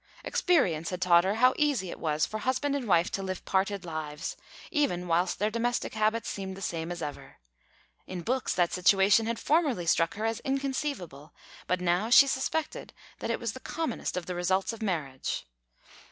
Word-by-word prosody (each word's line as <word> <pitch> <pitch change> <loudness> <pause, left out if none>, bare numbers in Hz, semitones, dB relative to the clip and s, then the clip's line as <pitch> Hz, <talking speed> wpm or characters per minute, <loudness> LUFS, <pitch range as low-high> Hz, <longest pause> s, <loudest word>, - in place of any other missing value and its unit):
Experience 180 - +1
had 180 - -4
taught 175 -2 +5
her 195 +2 +1
how 255 +3 +5
easy 280 - +1
it - - -8
was 155 -1 +1
for 215 - -5
husband 260 +4 0
and 265 -5 -3
wife 175 -2 +3
to 195 - -2
live 185 -1 -5
parted 195 0 0
lives, 155 -2 -5 0.4
even 180 -12 0
whilst 175 +2 +1
their 210 +2 0
domestic 240 +2 -1
habits 220 +1 0
seemed 190 -1 -5
the - - -8
same 170 -3 -3
as 175 - -5
ever; 145 -1 -7 0.7
in 180 -2 -5
books, 255 +5 -1
that 175 -1 +2
situation 195 +4 +4
had 230 0 -1
formerly 280 - +1
struck 165 0 +2
her 215 +2 -3
as 225 0 -1
inconceivable, 265 - -3 0.3
but 180 +1 +1
now 180 +5 +1
she 260 +3 +9
suspected 275 +3 -2 0.3
that - - -4
it - - 0
was - - -3
the - - -8
commonest 320 - -3
of 180 - -3
the 180 - -4
results 185 +4 0
of 225 - -10
marriage. 155 -10 -2
195 Hz, 185 wpm, -29 LUFS, 175-245 Hz, 0.7 s, she